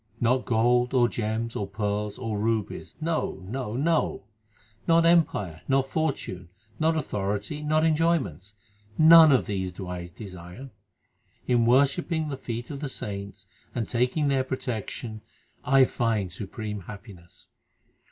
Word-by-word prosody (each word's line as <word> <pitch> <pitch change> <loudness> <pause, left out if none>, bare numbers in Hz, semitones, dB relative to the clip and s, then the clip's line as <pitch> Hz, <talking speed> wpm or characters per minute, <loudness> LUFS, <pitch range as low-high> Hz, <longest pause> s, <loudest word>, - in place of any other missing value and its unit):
Not 125 +2 +2
gold, 120 +2 +2
or 120 -2 +5
gems, 115 0 -3
or 100 - -2
pearls, 105 0 -2
1 130 -2 -6
or 105 -2 -2
rubies; 110 -1 -2
no, 160 - -1
no, 115 +1 -4
no! 160 -4 0 0.6
Not 165 0 +5
empire, 155 - +2
not 135 -1 +2
fortune, 130 - -2 0.3
not 160 +1 +2
authority, 105 +1 -3
not 155 +1 +2
enjoyments 155 - 0 0.4
none 160 0 +9
of 130 - +3
these 95 -3 -2
do 90 +1 -8
I 90 -1 -5
desire. 90 +6 -10 0.7
In 120 -2 +2
worshipping 150 +5 +2
the 140 - -3
feet 120 +1 -5
of 140 - -6
the 145 -1 -4
saints 100 -5 -6 0.3
and 115 - -2
taking 125 +5 +1
their 135 -2 +2
protection 115 -3 -5 0.4
I 135 0 +5
find 110 -7 -1
supreme 105 +1 -5
happiness. 95 -3 -12
120 Hz, 135 wpm, -26 LUFS, 105-140 Hz, 0.7 s, none